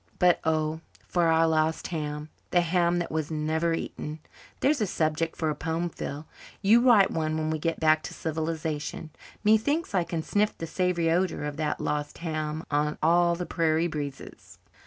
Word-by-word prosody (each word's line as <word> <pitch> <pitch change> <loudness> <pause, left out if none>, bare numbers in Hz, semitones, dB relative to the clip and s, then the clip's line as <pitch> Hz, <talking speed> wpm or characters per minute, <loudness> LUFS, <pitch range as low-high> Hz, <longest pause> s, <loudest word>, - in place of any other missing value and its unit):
But, 180 -1 +4
oh, 155 0 0 0.3
for 175 -2 +2
our 165 0 +4
lost 160 0 +1
ham! 150 -2 -4 0.2
'The 175 - +4
Ham 175 0 +2
That 175 - -2
Was 155 -1 -2
Never 160 +2 0
Eaten.' 155 -1 -5 0.4
There's 280 -2 +2
a 210 - +2
subject 160 0 -1
for 160 -2 0
a - - -3
poem, 165 +3 -2
Phil. 150 -1 -6 0.4
You 220 +4 +6
write 235 -6 +6
one 155 -1 -1
when 155 0 -1
we 160 - -1
get 165 +1 -1
back 155 -1 +4
to - - -6
civilization. 160 -1 -3 0.3
Methinks 225 +10 +2
I 180 -3 +3
can 165 -1 -3
sniff 210 +4 0
the 165 - -4
savoury 170 -1 0
odour 180 -2 0
of 150 0 -4
that 155 -1 -1
lost 150 0 -2
ham 155 -1 -3
on 150 +1 +1
all 170 +1 +4
the 180 +1 -4
prairie 165 -1 +1
breezes." 145 -4 -6
160 Hz, 180 wpm, -27 LUFS, 155-175 Hz, 0.4 s, You